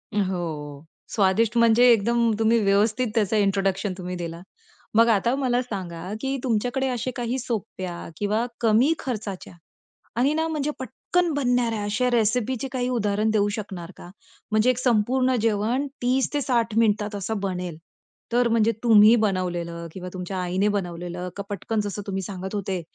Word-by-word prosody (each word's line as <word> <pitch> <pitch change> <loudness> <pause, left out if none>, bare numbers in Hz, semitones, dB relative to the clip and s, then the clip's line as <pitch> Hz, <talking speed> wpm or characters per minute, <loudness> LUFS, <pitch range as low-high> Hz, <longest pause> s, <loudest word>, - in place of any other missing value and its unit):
हो. 160 -7 -3 0.3
स्वादिष्ट 215 +3 +2
म्हणजे 235 +1 +6
एकदम 235 +1 +3
तुम्ही 225 +1 +4
व्यवस्थित 215 +5 +2
त्याचा 215 0 +2
इंट्रोडक्शन 195 -1 +1
तुम्ही 180 -1 -5
दिला. 170 -1 -6 0.5
मग 230 +1 +6
आता 230 +4 +2
मला 250 -3 +1
सांगा, 185 -6 -6
की 270 0 -1
तुमच्याकडे 250 +3 0
असे 250 0 -2
काही 245 +1 -2
सोप्या 185 -7 -5
किंवा 210 +3 0 0.2
कमी 235 +7 +4
खर्चाच्या 210 -8 -5 0.6
आणि 260 +5 +3
ना 320 +1 0
म्हणजे 300 -2 -1
पटकन 340 +7 -1
बनणाऱ्या 245 -5 +1
अशा 210 +5 0
रेसिपीचे 240 +3 +1
काही 250 -1 -1
उदाहरण 215 -3 0
देऊ 210 -1 +2
शकणार 190 -4 -6
का? 175 - -11 0.4
म्हणजे 215 +3 +3
एक 250 - 0
संपूर्ण 255 +2 +2
जेवण 225 +5 +1 0.2
30-60 250 -2 +1
मिनिटात 210 -2 +2
असं 200 +1 -3
बनेल. 180 -4 -3 0.6
तर 240 0 +3
म्हणजे 230 -1 +3
तुम्ही 220 -1 +7
बनवलेलं 175 -4 -2
किंवा 180 0 -7
तुमच्या 185 +1 -5
आईने 185 +3 +1
बनवलेलं 180 -2 -3
का 200 - -3
पटकन 210 +2 -2
जसं 205 0 -4
तुम्ही 195 -1 -3
सांगत 190 +1 -6
होते, 195 -2 -2
215 Hz, 145 wpm, -24 LUFS, 190-245 Hz, 0.6 s, तुम्ही